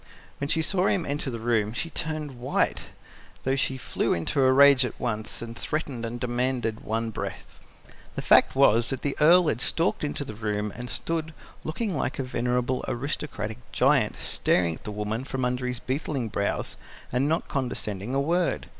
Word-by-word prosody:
When 140 - -1
she 160 +1 +1
saw 185 +3 +2
him 185 -4 +1
enter 145 0 -2
the 120 - -4
room, 110 -2 +1
she 165 +7 -3
turned 155 -5 -4
white, 125 - 0 0.5
though 135 +1 +1
she 135 -1 0
flew - - 0
into 85 - 0
a 130 0 +5
rage 140 0 +7
at 125 - -4
once, 115 -1 -2
and 115 0 -7
threatened 135 -5 -3
and 120 +1 -5
demanded 120 -2 -1
in - - -16
one 115 +1 -1
breath." - - -6 0.6
The - - -3
fact - - +5
was 120 -4 +5
that 135 - -2
the 145 - 0
Earl 170 +3 +7
had 120 -4 0
stalked 165 0 0
into 145 -1 -2
the 110 - -6
room 105 -1 -2
and 125 0 -6
stood, 160 +2 -2 0.3
looking 190 +4 -2
like 130 - -1
a 135 - -1
venerable 125 0 0
aristocratic 130 - -3
giant, - - +3
staring 85 -2 +1
at - - -12
the 105 - -4
woman 105 +3 -3
from 135 -1 -2
under 125 0 -1
his 125 -1 -2
beetling 130 -3 -2
brows, 100 -1 -2 0.3
and 130 +4 +1
not 165 +2 0
condescending 120 -4 -2
a - - +3
word. 170 +5 +1
130 Hz, 185 wpm, -26 LUFS, 115-145 Hz, 0.6 s, rage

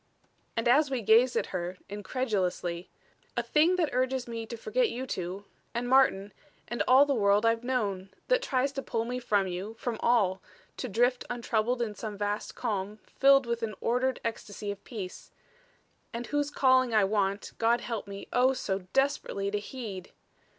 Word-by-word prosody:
And 230 - +1
as 285 +4 +5
we 260 -4 -2
gazed 235 +5 +5
at - - -1
her, 180 0 -3
incredulously: 190 -5 -2 0.5
"A - - +1
thing 320 +4 +3
that 335 -7 0
urges 255 0 0
me 230 -1 -5
to 235 - -6
forget 460 - +1
you 255 +2 -4
two 190 -3 -5 0.3
and 240 +1 -1
Martin 225 -7 +3 0.3
and 240 - -3
all 260 +3 +7
the 285 - +1
world 205 -2 +3
I've 230 +1 +2
known. 205 -7 -1 0.2
That - - +3
tries 275 - 0
to 275 - -4
pull 230 -3 -2
me 250 +1 -3
from 205 -5 +1
you 190 +4 -5
from 235 -2 -3
all 200 -6 +2 0.4
to 255 - -4
drift 245 +4 +2
untroubled 240 0 0
in 215 -3 -4
some 210 -1 -6
vast 205 +1 -3
calm 210 -3 -3
filled 275 0 +4
with 235 0 -2
an 215 -2 -3
ordered 250 +2 0
ecstasy 210 -2 -4
of 200 0 -9
peace. 200 -7 -7 0.8
And 235 +1 -5
whose 290 +1 -1
calling 260 -4 +3
I 210 - +5
want, 200 0 0
God 235 +1 +3
help 225 -4 -4
me, 200 0 -8
oh, 255 +2 +4
so 195 -6 -2
desperately 270 -7 0
to 210 - 0
heed! 205 -5 -7
230 Hz, 175 wpm, -29 LUFS, 200-255 Hz, 0.8 s, all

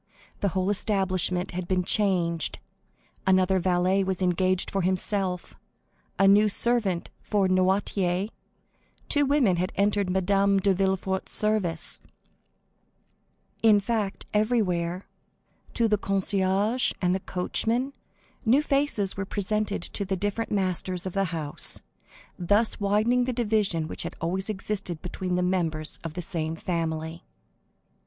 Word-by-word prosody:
The 200 - +1
whole 190 +1 0
establishment 185 -3 0
had 180 0 -4
been 185 -1 +1
changed; 175 -4 0 0.7
another 185 0 +4
valet 185 +2 +2
was 190 -1 -2
engaged 185 0 +1
for 195 - 0
himself, 185 0 -1 0.6
a 195 - +4
new 210 +2 +6
servant 205 -5 +1
for 200 -3 +1
Noirtier, 185 0 +1 0.8
two 290 -1 +3
women 260 -11 +3
had 180 +2 -1
entered 200 -1 +1
Madame 195 +1 +2
de 195 0 +2
Villefort's 190 0 -1
service,—in 210 +2 -3
fact, 210 -1 -2
everywhere, 190 -5 0 0.7
to 230 - +3
the 210 -2 +1
concierge 195 +4 +1
and 185 +1 0
coachmen, 235 +8 -1 0.5
new 260 +5 +4
faces 275 -10 0
were 195 - -3
presented 205 0 -2
to 200 - -1
the 195 0 -2
different 205 +4 -2
masters 185 -2 -1
of 185 - -4
the 195 0 +1
house, 160 -4 0 0.6
thus 205 +6 +2
widening 215 +5 +2
the 255 - -2
division 210 -8 0
which - - -5
had - - -5
always 185 +5 -1
existed 200 -4 -4
between 180 0 -3
the 180 - +1
members 165 -4 0
of 165 -1 -6
the 180 - -2
same 160 -2 -3
family. 165 -1 -3
190 Hz, 125 wpm, -26 LUFS, 180-210 Hz, 0.8 s, new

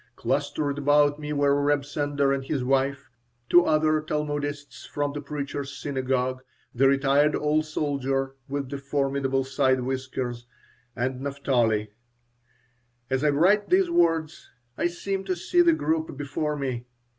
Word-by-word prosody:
Clustered 145 +1 -1
about 145 +1 +3
me 150 0 -5
were 145 -1 +2
Reb 145 -1 +1
Sender 145 -1 0
and 135 -1 -2
his 135 -1 -2
wife, 135 0 0 0.4
two 175 0 +6
other 155 0 +2
Talmudists 145 -1 -4
from 145 -1 -2
the 145 - -5
Preacher's 140 -1 -5
Synagogue, 130 -2 -1 0.3
the 135 +3 +4
retired 140 +2 +3
old 150 +1 +1
soldier 135 -3 -1 0.2
with 140 -1 -3
the 140 - -4
formidable 135 -1 0
side 130 -1 +1
whiskers, 130 -2 -4 0.5
and 130 +1 -2
Naphtali 120 -7 0 1.2
As 130 +2 +1
I 150 - +4
write 185 +8 +3
these 370 -1 +3
words 165 - +1 0.3
I - - +1
seem 195 +3 -3
to 185 -1 -1
see 185 - +2
the 345 -1 +5
group 160 - -1
before 145 +1 -2
me. 130 -4 -4
140 Hz, 140 wpm, -26 LUFS, 135-150 Hz, 1.2 s, two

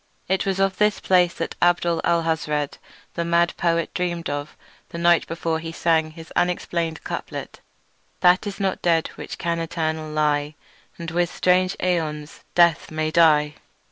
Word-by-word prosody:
It 190 +1 0
was 195 0 0
of 195 -1 +1
this 210 0 +2
place 180 -2 +3
that - - -4
Abdul 175 -1 +2
Alhazred 160 -3 0 0.3
the 170 - -2
mad 170 0 +2
poet 170 -1 0
dreamed 170 -3 -2
on 145 0 -3 0.4
the - - -7
night 170 0 +3
before 165 -1 -2
he 165 0 -6
sang 160 -1 +1
his 160 +1 -12
unexplainable 170 -2 -1
couplet: - - -6 0.6
"That 180 +3 +4
is 200 -1 -6
not 195 -1 -1
dead 165 -2 +2
which - - -8
can 170 -1 -1
eternal 160 -2 -2
lie, 150 -1 0 0.4
And 170 -1 -6
with 175 +1 0
strange 185 +1 +2
aeons 155 -4 -2
even - - -27
death 170 -2 +4
may 155 0 -2
die." 150 -3 +4
170 Hz, 160 wpm, -23 LUFS, 160-175 Hz, 0.6 s, That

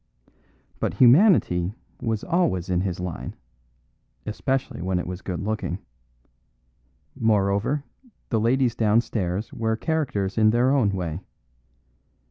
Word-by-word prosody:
But - - -1
humanity 120 - +5 0.3
was 110 -2 -1
always 95 - 0
in 90 -1 +2
his 95 -2 -2
line, 90 -1 -5 0.9
especially 130 - -2
when 95 +1 0
it 90 - -2
was 90 +1 -6
good 90 -3 -4
looking; 100 -3 -2 1.4
moreover, 105 +5 +1 0.5
the 115 - +1
ladies 120 +2 +2
downstairs 105 -4 0
were 110 -1 0
characters 115 - -1
in 110 0 +5
their 120 +4 +3
way. 90 -5 -2
105 Hz, 105 wpm, -24 LUFS, 90-120 Hz, 1.4 s, humanity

